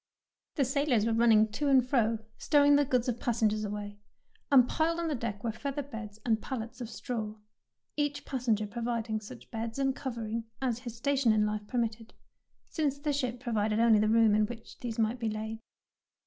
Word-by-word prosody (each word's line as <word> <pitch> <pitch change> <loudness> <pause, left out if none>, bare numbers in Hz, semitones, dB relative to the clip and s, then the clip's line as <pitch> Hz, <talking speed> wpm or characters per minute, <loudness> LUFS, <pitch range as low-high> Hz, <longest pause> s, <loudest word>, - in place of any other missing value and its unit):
The 280 - +2
sailors 265 -4 +1
were 230 - +1
run 230 +1 +4
ning 215 -1 +6
to 290 +7 -2
and 260 -3 +4
fro 230 -4 +2 0.2
stowing 290 -1 +5
the 290 0 +4
goods 250 -2 +1
of 240 -1 -1
passengers 215 -3 +1
away, 205 0 -5 0.5
and 255 -3 +7
piled 330 +4 0
on 335 -1 -1
the - - 0
deck 230 -5 -4
were 230 - 0
feather 280 +5 -4
beds 225 -6 -8
and 220 -2 +2
pallets 245 -1 -5
of 235 - -5
straw, 220 -4 -4 0.6
each 290 -1 -1
passenger 235 -5 0
providing 230 0 -2
such 125 - -12
beds 225 +1 -4
and 270 -1 +1
covering 230 -4 -4
as 245 -3 -1
his 240 -2 -7
station 270 -1 +2
in 215 -1 +3
life 210 0 -3
per 250 - -3
mitted, 225 -1 -2 0.5
since 290 -4 -1
the 290 +1 -1
ship 255 -4 -2
provided 220 -3 0
only 230 -2 +5
the 215 0 +2
room 225 -1 +5
in 210 0 +3
which 230 0 -10
these 235 -3 -5
might 225 +2 +1
be 225 -2 -1
laid. 220 +1 -4
230 Hz, 195 wpm, -30 LUFS, 215-265 Hz, 0.6 s, and